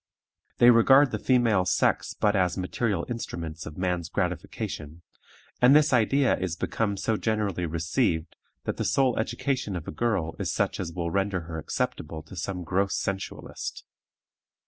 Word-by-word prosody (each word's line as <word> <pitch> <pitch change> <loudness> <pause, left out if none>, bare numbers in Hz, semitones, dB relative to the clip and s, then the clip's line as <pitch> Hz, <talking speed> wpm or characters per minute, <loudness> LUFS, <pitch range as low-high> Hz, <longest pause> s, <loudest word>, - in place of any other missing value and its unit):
They 120 +1 +8
regard 130 +4 +6
the 110 - -2
female 115 -7 +3
sex 90 - +1
but 105 0 +3
as 90 -2 +1
material 100 +3 -1
instruments 85 -9 -5
of 75 - -9
man's 90 -2 -1
gratification; 85 -3 -4 0.6
and 125 +3 +7
this 150 -2 +5
idea 130 +3 +3
is 90 -2 -2
become 100 +2 -1
so 110 +2 0
generally 105 -6 -1
received, 85 +1 -1 0.3
that - - -3
the - - -1
sole 130 -3 +2
education 120 -1 -2
of 85 -3 -6
a - - -3
girl 90 -4 -1
is - - -1
such - - -1
as 85 -3 -3
will 85 -1 -3
render 100 0 0
her 80 0 -6
acceptable 80 0 -3
to 80 - -12
some 90 +1 -4
gross 95 +4 0
sensualist. 95 -1 -5
95 Hz, 155 wpm, -27 LUFS, 85-115 Hz, 0.6 s, They